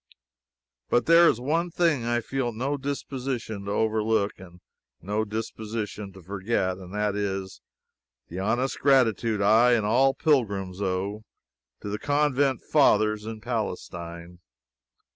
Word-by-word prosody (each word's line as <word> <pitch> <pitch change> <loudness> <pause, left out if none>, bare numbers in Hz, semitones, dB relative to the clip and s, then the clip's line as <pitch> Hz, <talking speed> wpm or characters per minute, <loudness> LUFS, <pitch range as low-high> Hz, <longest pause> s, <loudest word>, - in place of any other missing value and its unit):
But 120 - +2
there 170 +1 +7
is 115 - 0
one 165 +7 0
thing 165 -8 +1
I 120 0 +1
feel 130 0 -2
no 130 +6 -2
disposition 130 -6 -4
to 100 - -3
overlook, 110 -1 +1
and 90 -1 -13 0.4
no 105 +5 -1
disposition 110 -1 -5
to 95 -1 -14
forget: 95 0 -2
and 90 -1 -11
that 105 -1 0
is, 95 -2 -3 0.7
the 90 - -6
honest 120 +7 -1
gratitude 115 -6 +3
I 115 +4 +5
and 110 -3 +2
all 130 +5 +3
pilgrims 100 - 0
owe, 100 +3 -2 0.6
to 105 - -5
the 105 +1 -3
Convent 145 -3 +1
Fathers 110 -7 +3
in 110 -1 -6
Palestine. 90 -7 -5
110 Hz, 130 wpm, -26 LUFS, 100-130 Hz, 0.7 s, there